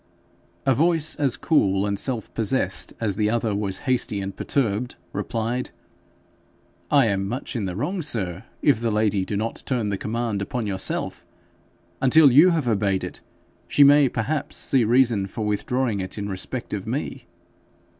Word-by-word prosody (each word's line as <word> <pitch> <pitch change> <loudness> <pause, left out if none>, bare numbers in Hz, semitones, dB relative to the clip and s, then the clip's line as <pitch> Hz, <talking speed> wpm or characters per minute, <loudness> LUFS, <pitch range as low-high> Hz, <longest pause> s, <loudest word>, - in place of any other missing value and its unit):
A 135 - +4
voice 160 +2 +2
as 140 -4 +1
cool 100 - +2
and 100 -1 -1
self 120 -4 -2
possessed 100 -6 -1
as 105 -4 -1
the 105 -1 +2
other 115 -1 0
was 100 -2 -2
hasty 125 -5 0
and 95 0 -5
perturbed, 120 -2 -1 0.2
replied, 115 +2 -2 1.2
'I 140 -3 +5
am 95 -3 0
much 125 +5 -4
in 110 -4 -1
the 90 -2 -4
wrong, 170 - -2
sir, 100 - -2 0.2
if 140 -7 +4
the 115 - 0
lady 105 -3 +1
do 100 - -3
not 110 +2 -3
turn 120 -6 0
the 100 -1 -2
command 110 -2 -2
upon 120 +1 -3
yourself. 95 -2 -3 0.8
Until 140 +1 +6
you 150 +8 +7
have 160 -7 0
obeyed 100 -4 +1
it, - - -7 0.5
she 145 - +5
may 140 -1 +6
perhaps 135 +7 -3
see 130 -3 +1
reason 115 -3 +3
for 110 +2 -5
withdrawing 120 +1 -1
it 95 +2 -4
in 100 -1 -3
respect 95 -2 -5
of - - -4
me.' - - -4
115 Hz, 165 wpm, -24 LUFS, 100-130 Hz, 1.2 s, you